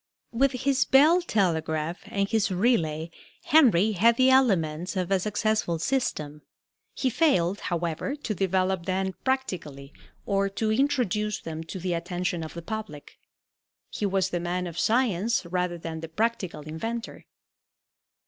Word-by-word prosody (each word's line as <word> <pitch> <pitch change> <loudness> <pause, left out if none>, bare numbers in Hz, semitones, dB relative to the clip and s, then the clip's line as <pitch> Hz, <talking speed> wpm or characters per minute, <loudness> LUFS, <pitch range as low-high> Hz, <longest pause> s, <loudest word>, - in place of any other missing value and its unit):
With 265 +3 +2
his 265 +1 +1
bell 310 +7 +5
telegraph 165 - -1
and 200 0 -1
his 220 0 +1
relay 170 -6 +1 0.3
Henry 220 - +5
had 225 +4 +3
the 260 0 +5
elements 185 -9 +2
of 185 0 -2
a 195 - +3
successful 215 -3 0
system. 155 - -2 0.5
He 260 - 0
failed, 200 - +2
however, 170 - -2
to 280 -7 -4
develop 190 -2 0
them 190 0 -1
practically 165 - -3 0.3
or 195 0 +1
to 215 +2 -1
introduce 220 -5 0
them 160 0 -6
to 175 - -7
the 180 0 -2
attention 175 0 -2
of 160 - -8
the 170 - -7
public. 215 -8 -7 0.7
He 205 - -2
was 190 -1 0
the 175 - -1
man 175 +1 -2
of 175 -1 -6
science 230 -3 +1
rather 180 0 -2
than 165 -1 -6
the 165 0 -7
practical 205 -3 -2
inventor. 225 +10 -6
190 Hz, 140 wpm, -26 LUFS, 170-230 Hz, 0.7 s, bell